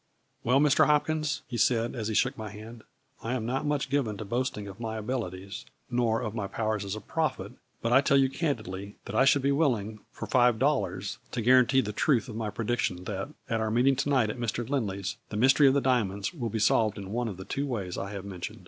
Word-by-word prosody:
" - - -44
Well, 125 +3 +3
Mr. 150 0 +4
Hopkins," 150 0 +1
he 120 - -4
said, 115 +1 +2
as 110 -3 -3
he 110 - -2
shook 130 +5 +2
my 110 -3 -6
hand, 110 +2 -10 0.2
" 135 - -45
I 120 +3 -2
am 115 -3 -3
not 130 +5 -1
much 145 -2 0
given 125 -8 0
to 105 - -6
boasting 120 -1 -2
of 100 +2 -10
my 110 -1 -4
abilities, 105 -4 -4 0.3
nor 120 -2 +1
of 110 -2 -3
my 105 -4 -3
powers 110 0 -2
as 100 +1 -4
a - - -5
prophet - - -2 0.3
but 115 +1 +1
I 135 - +7
tell 140 0 +3
you 135 -1 +5
candidly 110 - -3
that - - -7
I 135 - +4
should 135 0 +4
be 140 - +3
willing, 115 -8 0
for - - -6
five 120 -3 +3
dollars, 140 +3 0
to 120 - -1
guarantee 130 +2 +5
the 105 -3 -4
truth 125 +2 +2
of 115 - -7
my 110 -1 -2
prediction 105 -4 -2
that, 95 +6 -4 0.2
at 115 -1 -1
our 110 - 0
meeting 125 +5 +3
to 140 - 0
night 125 -6 +3
at 120 - -8
Mr. 120 0 -2
Lindley's, 105 -6 -2
the 105 - -4
mystery 130 +5 +5
of 135 - +4
the 140 - +3
diamonds, 100 -7 0
will 120 -9 -3
be 110 - -3
solved 110 0 +2
in 100 -1 -7
one 120 +2 -1
of 100 -5 -5
the 95 - -8
two 140 +1 -2
ways 100 -9 -3
I 100 - -4
have 100 -1 -6
mem 95 -3 -8
tioned." - - -5
115 Hz, 245 wpm, -28 LUFS, 105-130 Hz, 0.3 s, I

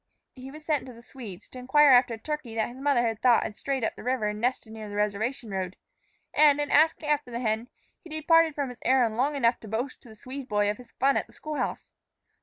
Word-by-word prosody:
He 260 0 -10
was 305 +2 -12
sent 300 -4 0
to 255 - -9
the 235 0 -15
Swede's 225 -9 -10
to 255 - -9
inquire 280 +3 +5
after 245 -2 +5
a - - -12
turkey 265 -2 -5
that 220 0 0
his 250 +2 -11
mother 245 -5 +2
thought 235 +2 +3
had 210 - -5
strayed 270 0 -3
up - - -1
the - - -10
river 250 -2 0
and 210 +1 -5
nested 245 -2 -1
near 215 -1 -8
the 205 - -7
reservation 210 +3 -2
road; 185 -1 -3 0.6
and, 295 -1 +5
in 290 - -2
asking 310 0 +3
after 295 -3 0
the 235 0 -4
hen, 225 +1 -1 0.3
he 340 - -12
departed 320 0 +3
from 280 -3 -2
his 245 - -10
errand 245 -3 +3
long 275 +5 +1
enough 240 -3 +2
to 220 - -11
boast 235 +5 -4
to 240 - -16
the 220 - -13
Swede 260 +4 -8
boy 205 0 +2
of 210 - -7
his 250 - -15
fun 275 +1 +2
at - - -2
the - - -20
school 305 -1 -6
house. - - -3
250 Hz, 250 wpm, -27 LUFS, 220-285 Hz, 0.6 s, inquire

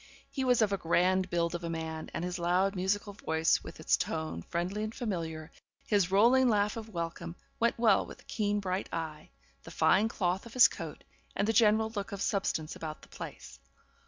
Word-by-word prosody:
He 265 - -2
was 250 -3 +4
of 205 - +1
a 195 - -1
grand 185 +3 +2
build 170 -1 0
of 175 0 -4
a 170 - -3
man, 160 -1 -4
and 175 - -3
his 180 0 -4
loud 180 +3 +2
musical 200 +2 -1
voice, 160 -4 +1
with - - -10
its - - +3
tone 80 +1 -3
friendly 180 - -3
and 215 +1 -5
familiar, 165 -9 -4 0.3
his 200 -4 +2
rolling 240 +6 +5
laugh 210 -1 +2
of 225 -1 -7
welcome, 170 -2 -5 0.2
went 235 0 +2
well 225 -4 +4
with - - -10
the - - -19
keen 205 -1 -1
bright 190 -1 -3
eye, 160 -2 -5 0.3
the - - -12
fine 210 +3 +3
cloth 190 -1 -1
of 230 - -13
his 250 - +9
coat, - - -8 0.3
and 200 - 0
the 225 - +2
general 220 -1 +4
look 205 -1 -4
of 200 -1 -5
substance 165 -6 -1
about 155 -2 -7
the - - -15
place. 70 0 -9
190 Hz, 200 wpm, -31 LUFS, 170-215 Hz, 0.3 s, his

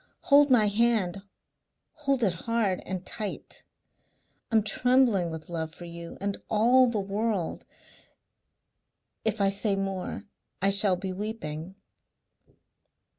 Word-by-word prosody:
Hold 290 0 +7
my 240 -5 +5
hand 205 -3 +1 0.7
hold 275 -5 -1
it 190 -5 +3 0.2
hard 220 -5 +1
and 185 -1 -4
tight. 210 -2 -5 0.9
I'm 220 -2 +4
trembling 230 -4 +3
with 160 -1 -7
love 160 -2 -4
for 175 - -10
you 170 0 -9
and 200 +1 -3
all 245 +4 +5
the 230 -3 -1
world.... 200 -2 -2 1.6
If 220 -1 0
I 195 -1 +3
say 200 0 0
more 195 +1 -4 0.3
I 195 +2 +3
shall 200 -1 +5
be 185 +1 -5
weeping." 190 -4 -5
200 Hz, 120 wpm, -27 LUFS, 185-225 Hz, 1.6 s, Hold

